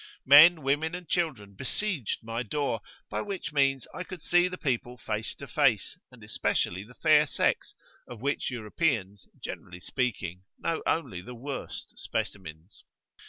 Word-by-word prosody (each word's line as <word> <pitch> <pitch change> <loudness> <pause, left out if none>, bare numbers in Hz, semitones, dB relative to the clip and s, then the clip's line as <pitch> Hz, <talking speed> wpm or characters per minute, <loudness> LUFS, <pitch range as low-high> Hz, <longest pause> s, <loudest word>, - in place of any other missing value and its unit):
Men, 155 +4 +9
women, 150 +5 +1
and 180 -2 -8
children 140 - -1
besieged 135 - -2
my 115 +1 -3
door, 125 -1 -1 0.3
by - - -1
which 195 -7 -4
means 135 -2 +2
I 180 - -4
could 185 -1 -8
see 175 +1 +4
the 180 0 -5
people 125 -4 -1
face 110 -1 -3
to - - -9
face, - - +2 0.2
and - - -15
especially 90 +3 0
the 120 +4 -16
fair 155 -1 +5
sex, - - 0 0.3
of 120 -3 -9
which 140 +4 -1
Europeans, 110 - -1
generally 90 -1 -7
speaking, 95 -6 -2 0.2
know 165 - -1
only 95 - 0
the 125 +7 -9
worst 135 +3 -6
specimens. 80 0 -5
130 Hz, 150 wpm, -29 LUFS, 105-160 Hz, 0.3 s, Men